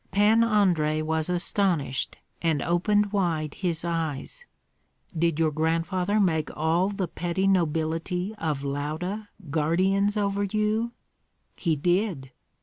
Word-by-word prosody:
Pan 210 +4 +4
Andrei 175 -9 +2
was 160 +1 -1
astonished 175 -6 0 0.2
and 160 -4 +1
opened 205 +4 +2
wide 165 -7 0
his 170 -3 -2
eyes, 165 - -3 0.7
"Did 165 -1 +1
your 160 -1 +2
grandfather 165 +6 0
make 160 -6 +1
all 165 +5 +2
the 195 -3 -2
petty 175 +3 -2
nobility 175 +1 0
of 150 -4 -2
Lauda 155 +9 -3 0.2
guardians 190 +7 +2
over 200 -1 0
you?" 215 +3 0 0.6
"He 165 -4 0
did. 175 -3 0
175 Hz, 115 wpm, -26 LUFS, 160-200 Hz, 0.7 s, Pan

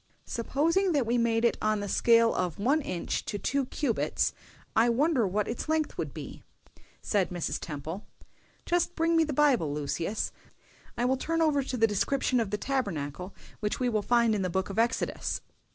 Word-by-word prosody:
"Supposing 330 - +1
that 280 -5 +2
we 240 +2 +1
made 230 0 +2
it 235 - +2
on 215 0 +1
the 205 - -3
scale 230 +3 +4
of 180 -4 -2
one 275 +10 +2
inch 180 -10 -3
to 205 - -3
two 275 +5 -1
cubits, 260 -4 0 0.4
I 230 +2 +5
wonder 255 -1 +2
what 205 +3 -1
its 235 +6 -4
length 315 -1 0
would - - -2
be?" - - -8 0.6
said 200 -4 +1
Mrs. 175 -2 -2
Temple. 155 +6 -6 0.6
"Just 350 0 +1
bring 330 0 +2
me 325 - +5
the 310 - -2
Bible. 260 - +3
Lucius, 150 +8 -2 0.7
I 240 - +1
will 260 +1 +2
turn 330 +5 -1
over 305 -3 +3
to 260 -1 -4
the 225 - +5
description 250 +4 +1
of 225 -4 -1
the 210 - -1
Tabernacle, 185 - -3 0.2
which 210 -1 -2
we 250 -1 +1
will 215 -3 +1
find 235 +1 +3
in 210 - 0
the 185 - -1
Book 190 +2 -1
of 205 - -2
Exodus." 235 +1 0
230 Hz, 185 wpm, -29 LUFS, 200-275 Hz, 0.7 s, I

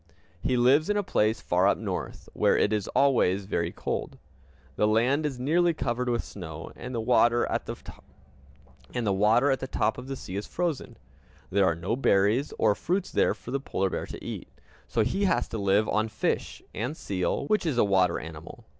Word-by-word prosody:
He 125 - +1
lives 135 +7 +4
in 205 - +2
a 205 - +1
place 110 - +1
far 90 +2 +2
up - - +3
North, - - -5
where - - +3
it 105 - +2
is 105 -2 -1
always 100 -9 +3
very 85 -3 -1
cold. - - -4 0.6
The 105 - +2
land 125 +8 +2
is 135 -4 -5
nearly 165 +6 +2
covered 125 -2 -1
with 120 -1 0
snow, 80 -4 -8
and 125 0 -7
the - - -1
water 120 +1 +3
at - - -3
the - - -4 2.0
top 110 +1 0
of 125 - -9
the 135 - -4
sea 95 - -8
is 100 - -4
frozen. 170 -5 -3 0.5
There 100 0 +3
are 85 - +2
no 90 +7 -2
berries 110 +2 +2
or 105 -2 +4
fruits 180 - -2
there - - +2
for 120 - -10
the 140 - 0
polar 95 -8 -1
bear - - -3
to - - -9
eat; - - -6 0.4
so 115 - +1
he 195 - 0
has - - +1
to 115 - -4
live 100 +2 +2
on 110 +1 +1
fish, 110 - -2
and 125 +10 -3
seal, 95 +7 -2
which 210 0 +1
is 140 -6 0
a 120 - +4
water 95 -2 +2
animal. 80 +1 -10
115 Hz, 190 wpm, -27 LUFS, 100-135 Hz, 2.0 s, lives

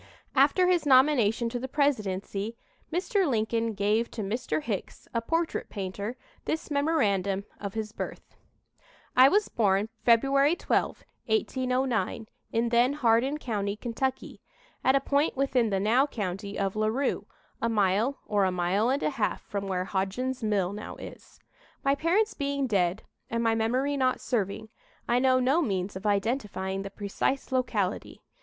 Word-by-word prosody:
After 285 +7 +4
his 360 -3 +3
nomination 255 -4 +4
to 245 +1 -3
the 260 - -4
presidency, 215 -6 -1 0.3
Mr. 375 +1 +1
Lincoln 225 -1 0
gave 210 +3 +1
to 220 - -5
Mr. 205 -6 -2
Hicks, 205 -5 -5
a 230 - 0
portrait 330 +7 -1
painter, 200 +4 -5 0.3
this 315 0 -3
memorandum 200 - +1
of 200 0 -6
his 215 -1 -3
birth: - - -7 0.8
"I 260 +2 +8
was 415 +5 +2
born 205 -1 +1
February 275 +6 +4
12, - - -1 0.2
1809, 255 - 0 0.3
in 230 +1 +1
then 240 +3 +3
Hardin 260 +1 +2
County, 205 -7 -2
Kentucky, 255 +4 -3 0.4
at 265 - +4
a - - +5
point 280 +2 +1
within 255 -4 +2
the 195 -1 0
now 235 +8 +3
county 200 -4 -4
of 195 0 -1
Larue, 220 +6 0 0.3
a 230 - +1
mile 215 +5 +2
or 205 -2 +1
a 185 - +1
mile 180 +6 +1
and 275 +2 0
a - - +1
half 230 -6 -1
from 200 -1 -4
where 185 -1 -1
Hodgen's 205 +8 -2
mill 200 -4 0
now 210 +1 -7
is. - - -12 0.4
My 275 - +3
parents 350 +9 +1
being 280 -1 -1
dead, 195 -4 +1 0.3
and 230 0 -1
my 225 -1 +3
memory 250 +6 0
not 255 -1 +1
serving, 220 -1 -2 0.4
I 240 +1 +3
know 255 0 +4
no 270 +7 +3
means 195 - -2
of 190 +3 -4
identifying 200 -2 -1
the 195 - -5
precise 205 +8 -2
locality. 235 -7 -1
230 Hz, 150 wpm, -28 LUFS, 200-270 Hz, 0.8 s, I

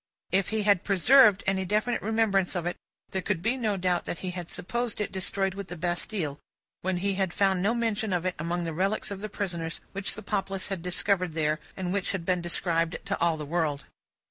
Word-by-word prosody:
If 190 0 +2
he 220 -1 0
had 200 -2 +4
preserved 210 +1 +6
any 190 0 +1
definite 215 +6 0
remembrance 210 -4 +2
of 175 -2 -1
it, 175 - -1 0.4
there 190 - -1
could 165 -1 -1
be 230 +4 +2
no 220 -6 0
doubt 180 -1 +1
that - - -3
he 180 - -1
had 175 -2 -6
supposed 235 +4 -2
it 210 - -2
destroyed 195 0 0
with 200 -1 -6
the 175 - -6
Bastille, 175 -2 -1 0.4
when 185 0 0
he 200 - +2
had 190 -2 0
found 190 -2 +3
no 215 +5 +2
mention 220 -3 0
of 180 -1 0
it 185 - +1
among 170 +2 -1
the 165 -1 -3
relics 195 +6 0
of 200 +1 -5
prisoners 170 -5 -3
which 200 0 -2
the - - -8
populace 195 0 -2
had 195 -3 -3
discovered 180 0 +1
there, 155 -1 +1 0.2
and 185 -1 -2
which 200 0 0
had 185 -4 -3
been 180 -1 +1
described 170 0 +1
to 200 0 -2
all 170 -1 +3
the 150 - -5
world. 150 -2 -1
190 Hz, 215 wpm, -28 LUFS, 175-200 Hz, 0.4 s, preserved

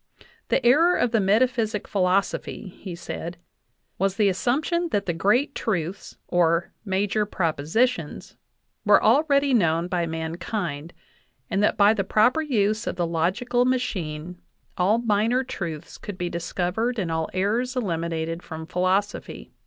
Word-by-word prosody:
"The - - +1
error 325 +9 +5
of 245 - +1
the 225 - +3
metaphysic 220 +1 +1
philosophy," 195 +1 0
he 185 0 -8
said, 170 0 -6 0.6
"was 195 0 +1
the 205 -1 +3
assumption 305 - 0
that 200 -8 0
the 175 - -1
great 230 - +2
truths 185 -3 -3
(or 170 -1 +1
"major 205 +1 0
propo 165 -6 -1
sitions") 245 +8 0 0.5
were - - +5
already 280 -2 +3
known 170 -6 +2
by 175 -2 -1
mankind, 165 0 -4 0.6
and 195 - +1
that 210 - +2
by 205 +1 +6
the 200 -3 -1
proper 230 +10 +3
use 215 -6 0
of - - -2
the 175 -1 0
logical 185 +10 0
machine 180 -10 -2 0.3
all 195 +5 +3
minor 230 +2 +1
truths 170 - -6
could 205 -3 -7
be 175 -1 -2
discovered 185 +8 -2
and 180 -6 -2
all 160 0 -1
errors 225 +7 0
eliminated 165 -6 -2
from 160 -2 -8
philosophy." 185 +4 -1
195 Hz, 140 wpm, -24 LUFS, 170-235 Hz, 0.6 s, by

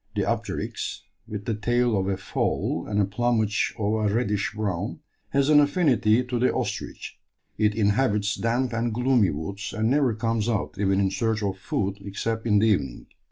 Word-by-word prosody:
The 100 - +1
apteryx, 110 -4 -3 0.2
with 105 -1 -6
the 115 - 0
tail 120 +2 +1
of 95 -1 0
a 95 -1 0
fowl 95 - -2
and 105 -1 0
a 100 - +4
plumage 110 +1 0
of 105 0 0
a 110 -2 +1
reddish 105 -2 0
brown, 105 - -3 0.3
has 140 0 +2
an 150 -1 +7
affinity 140 - +3
to 125 -1 -3
the 125 - +3
ostrich; - - -4 0.4
it 105 -1 +2
inhabits 105 -1 +2
damp 120 +3 0
and 115 +1 0
gloomy 125 -3 +3
woods, 100 +8 -5
and 110 +2 +1
never 135 -5 +2
comes 115 0 -1
out 100 -3 -2
even 95 -1 +2
in 95 -1 +2
search 110 0 -1
of 95 -1 -2
food 100 0 -2
except 110 +3 -3
in 105 -2 +4
the 105 - +4
evening. 70 - -1
110 Hz, 180 wpm, -25 LUFS, 100-120 Hz, 0.4 s, an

